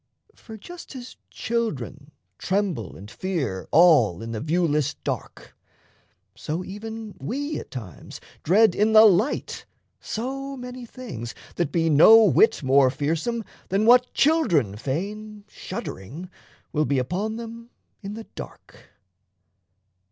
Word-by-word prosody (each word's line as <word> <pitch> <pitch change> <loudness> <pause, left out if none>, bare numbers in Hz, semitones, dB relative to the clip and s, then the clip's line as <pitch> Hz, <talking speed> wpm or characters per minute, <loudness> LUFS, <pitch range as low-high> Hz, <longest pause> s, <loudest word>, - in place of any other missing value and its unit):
For 220 - -12
just 345 - -11
as 250 -1 -9
children 150 - -3 0.3
tremble 185 - -2
and 100 +3 -11
fear 135 - -3
all 150 - +5
In 115 - -6
the 110 - -3
viewless 150 -2 0
dark, - - -6 0.8
so 165 +4 -4
even 220 +1 -7
we 285 +5 -3
at - - -10
times 110 -9 -9 0.2
Dread 205 +4 +4
in 215 +3 +2
the 220 0 +9
light 210 +6 +1 0.3
so 270 +4 -5
many 250 -1 -8
things 125 - -8 0.2
that 170 -5 -2
be 165 0 +1
No 190 +9 +8
whit 390 - +4
more 135 0 +5
fearsome 160 - -2 0.3
than 195 +3 +1
what 245 +1 +5
children 175 - +2
feign, 205 - -5
Shuddering, 150 - -7 0.4
will 155 -1 +1
be 140 - 0
upon 185 - -2
them 230 0 -8 0.3
in 200 0 -6
the 225 0 -8
dark. - - -12
195 Hz, 125 wpm, -24 LUFS, 145-225 Hz, 0.8 s, the